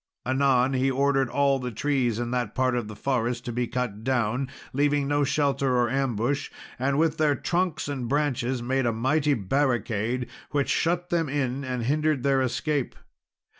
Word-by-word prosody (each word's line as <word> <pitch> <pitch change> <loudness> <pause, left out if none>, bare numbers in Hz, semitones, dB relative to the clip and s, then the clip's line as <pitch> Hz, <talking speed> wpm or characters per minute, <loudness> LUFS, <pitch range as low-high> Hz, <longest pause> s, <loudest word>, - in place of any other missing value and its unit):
Anon, 130 0 +2
he 130 +1 +2
ordered 135 -1 +2
all 140 +1 +2
the 125 -1 -3
trees 125 -1 0
in 120 0 -3
that 125 -4 -2
part 130 -1 +2
of 120 -3 -2
the 105 - -8
forest 120 -1 -1
to 120 - -3
be 120 +1 -1
cut 120 -4 -3
down, 125 +1 0 0.2
leaving 145 +1 +2
no 145 0 +2
shelter 140 -2 +1
or 120 -1 +2
ambush; 135 +1 0 0.3
and 135 +2 +1
with 160 0 +2
their 150 -2 +3
trunks 175 -1 -1
and 135 -4 -3
branches 130 -3 0
made 130 0 0
a 115 - +1
mighty 145 +5 +2
barricade, 120 0 0 0.2
which 145 -2 0
shut 175 +1 0
them 165 -4 +1
in 135 -1 -1
and 125 -2 -3
hindered 150 +1 +1
their 135 -1 +3
escape. 140 +2 -1
130 Hz, 170 wpm, -26 LUFS, 120-145 Hz, 0.3 s, their